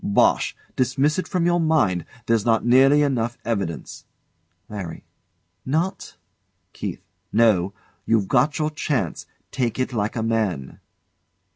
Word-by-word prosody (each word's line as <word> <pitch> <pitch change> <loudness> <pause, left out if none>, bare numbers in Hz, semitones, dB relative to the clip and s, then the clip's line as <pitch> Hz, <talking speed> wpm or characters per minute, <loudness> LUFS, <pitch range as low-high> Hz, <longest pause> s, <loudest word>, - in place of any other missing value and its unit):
Bosh! 100 - +2 0.2
Dismiss 135 +6 +1
it - - -3
from 180 -2 0
your 175 0 +3
mind; 135 - +2 0.2
there's 115 -2 +2
not 115 0 +2
nearly 135 +4 +6
enough 120 -4 0
evidence. 100 -8 -3 0.6
LARRY. 95 -6 -7 0.6
Not? 160 +8 -2 0.6
KEITH. - - -5 0.3
No. 105 -5 +3 0.3
You've 110 -4 +2
got 135 +6 +2
your 155 0 0
chance. 150 -4 -2 0.2
Take 125 -4 -1
it 130 0 -1
like 105 0 -1
a 115 - -1
man. 110 -12 -1
120 Hz, 125 wpm, -23 LUFS, 105-145 Hz, 0.6 s, nearly